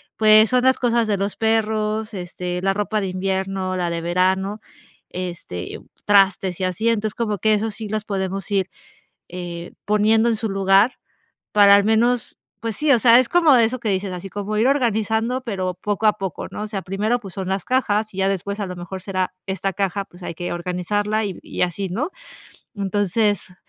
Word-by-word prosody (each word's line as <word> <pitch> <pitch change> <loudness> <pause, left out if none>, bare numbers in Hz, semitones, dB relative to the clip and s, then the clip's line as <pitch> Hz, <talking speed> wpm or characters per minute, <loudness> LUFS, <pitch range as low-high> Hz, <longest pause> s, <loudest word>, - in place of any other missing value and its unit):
pues, 215 0 +6
son 250 0 +2
las 260 0 +4
cosas 235 -2 +1
de 205 -2 +1
los 200 +1 -3
perros, 220 -1 0
este, 180 -1 -4
la 195 0 +1
ropa 210 +1 -1
de 195 - -2
invierno, 190 0 -2
la 175 -1 -1
de 170 0 -3
verano, 190 +4 0 0.5
este, 175 - -6 0.3
trastes 195 -2 +3
y 185 - 0
así, 185 +5 0
entonces, 215 -2 -1
como 215 -4 -2
que 215 +4 +3
eso 220 +1 -1
sí, 215 +1 -7
los 215 0 -3
podemos 195 -1 -3
ir, 195 -2 +1 0.6
eh, 175 -1 -7
poniendo 215 +2 +3
en 230 - +1
su 220 0 -3
lugar, 195 +4 +3 0.5
para 200 -1 +7
al 200 - +4
menos 230 +2 +1 0.2
Pues 225 -2 -4
sí, 300 +4 +1
o 250 - +6
sea, 235 +2 +7
es 255 - +1
como 330 -6 +5
eso 235 +2 +2
que 225 - -5
dices, 190 0 -1
así 180 +2 -6
como 205 +2 -3
ir 220 - +3
organizando, 230 -2 +1
pero 190 -7 -3
poco 210 +3 -1
a 210 - +5
poco, 195 -4 -5
¿no? - - -6
O 215 - -4
sea, 200 -2 -4
primero, 210 +7 -1
pues 195 -5 -11
son 190 -1 -4
las 195 0 -2
cajas, 215 -5 0
y 190 - -11
ya 195 0 +2
después, 200 +2 -3
a 205 - -1
lo 180 -1 -6
mejor, 175 +2 -7
será 185 -1 -2
esta 195 0 -2
caja, 195 +1 -1
pues 175 +1 -16
hay 170 - -4
que 175 +1 -5
organizarla, 205 +5 -1
y 195 -4 -5
y - - -6
así, 185 +2 0
¿no? 260 - -2 0.7
Entonces, 205 0 0
200 Hz, 200 wpm, -21 LUFS, 185-220 Hz, 0.7 s, para